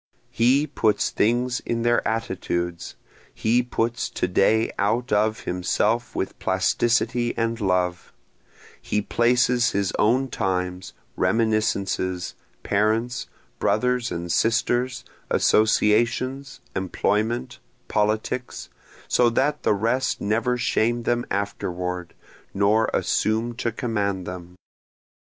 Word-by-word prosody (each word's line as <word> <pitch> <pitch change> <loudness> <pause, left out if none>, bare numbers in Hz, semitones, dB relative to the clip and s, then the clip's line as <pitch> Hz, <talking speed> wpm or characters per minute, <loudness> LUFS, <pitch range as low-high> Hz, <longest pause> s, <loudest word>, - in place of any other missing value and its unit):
He 130 +6 +3
puts 115 -7 +1
things 120 +3 +1
in 115 0 -3
their 120 0 +2
attitudes, 90 -6 -3 0.4
He 115 +3 +2
puts 120 -1 -2
to - - -2
day 110 +5 +2
out 115 +4 0
of 110 +2 +1
himself 105 +6 -1
with 95 - -3
plasticity 120 +5 +1
and 115 0 -1
love, 90 -2 0 0.7
He 105 - -1
places 120 +2 +2
his 100 -1 0
own 130 +5 +2
times, 90 -3 -2 0.2
reminiscences, 100 -3 0 0.3
parents, 110 +4 0 0.3
brothers 125 -1 +1
and 85 0 -4
sisters, 120 +5 +1 0.2
associations, 120 +6 +2
employment, 110 +6 -1 0.3
politics, 110 +4 -1 0.4
so 120 -1 +4
that 145 +5 0
the - - +2
rest 115 +6 0
never 115 +4 0
shame 120 0 +1
them 120 +1 0
afterward, 90 -3 -3 0.4
nor 105 +3 +3
assume 110 +2 0
to 120 -2 -1
command 100 -6 -2
them. 90 0 -8
110 Hz, 100 wpm, -24 LUFS, 100-120 Hz, 0.7 s, so